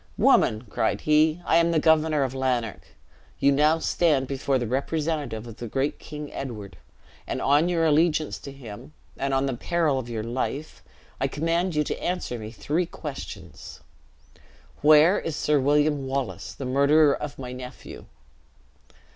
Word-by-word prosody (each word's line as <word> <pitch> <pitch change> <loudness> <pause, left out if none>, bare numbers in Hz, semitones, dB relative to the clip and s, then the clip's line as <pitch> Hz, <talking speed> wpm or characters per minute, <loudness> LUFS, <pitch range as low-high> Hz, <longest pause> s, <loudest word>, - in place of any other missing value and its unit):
"Woman!" 110 +2 +3
cried 110 - -1
he, 155 +2 +3
"I 165 - +4
am 170 0 +4
the 165 - +1
Governor 155 -2 +3
of 130 -1 -2
Lanark. 125 -5 -2 0.5
You 140 - +3
now 150 +3 +4
stand 155 -4 +1
before 135 0 0
the 120 - -2
representative 145 -1 -2
of 115 -2 -10
the 120 - -6
great 135 +6 -1
King 150 -1 -8
Edward, 105 -9 -7 0.5
and - - -3
on 145 +5 +3
your 165 -2 +1
allegiance 155 0 +2
to 140 - -9
him, 130 +1 -11 0.2
and 140 0 -2
on 135 0 +1
the 135 - -1
peril 155 0 0
of 120 -2 -7
your 110 -2 -3
life, 130 +6 -4 0.4
I 135 - +1
command 165 +5 -1
you 150 - +2
to - - -5
answer 175 -9 -2
me 110 0 -7
three 155 +9 -2
questions. 150 -5 -9 1.0
Where 155 +5 +6
is 165 - -4
Sir 150 -1 +2
William 145 0 +2
Wallace, 135 -2 -4
the 135 - -6
murderer 140 +3 +4
of 145 -1 -6
my 125 -2 -6
nephew? 125 0 -9
140 Hz, 160 wpm, -25 LUFS, 130-155 Hz, 1.0 s, Where